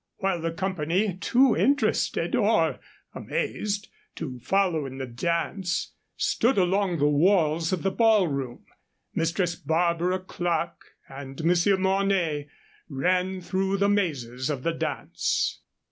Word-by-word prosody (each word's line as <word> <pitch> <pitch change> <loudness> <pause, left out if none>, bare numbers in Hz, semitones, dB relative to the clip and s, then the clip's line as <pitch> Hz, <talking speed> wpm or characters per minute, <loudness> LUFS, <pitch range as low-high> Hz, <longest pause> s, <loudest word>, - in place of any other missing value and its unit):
While 190 -3 -1
the 165 0 -1
company, 185 +2 -1
too 245 +6 +3
interested 285 +2 +1
or - - +2 0.3
amazed 205 -1 -3 0.3
to 130 -6 -6
follow 175 -1 +1
in 135 0 -8
the 135 - -3
dance, 170 - -2 0.2
stood 245 +1 +1
along 190 -1 +2
the 145 -1 +3
walls 160 +1 +3
of 185 - -1
the 195 - +1
ballroom, 180 - +1 0.5
Mistress 170 +2 0
Barbara 170 +4 +1
Clerke 175 -2 -3
and 135 +2 -8
Monsieur 180 +3 +3
Mornay 190 -6 +1 0.4
ran 180 +6 0
through 190 +2 -1
the 200 +1 +2
mazes 135 - -1
of 140 -4 -3
the 165 - 0
dance. - - -2
175 Hz, 120 wpm, -26 LUFS, 155-195 Hz, 0.5 s, too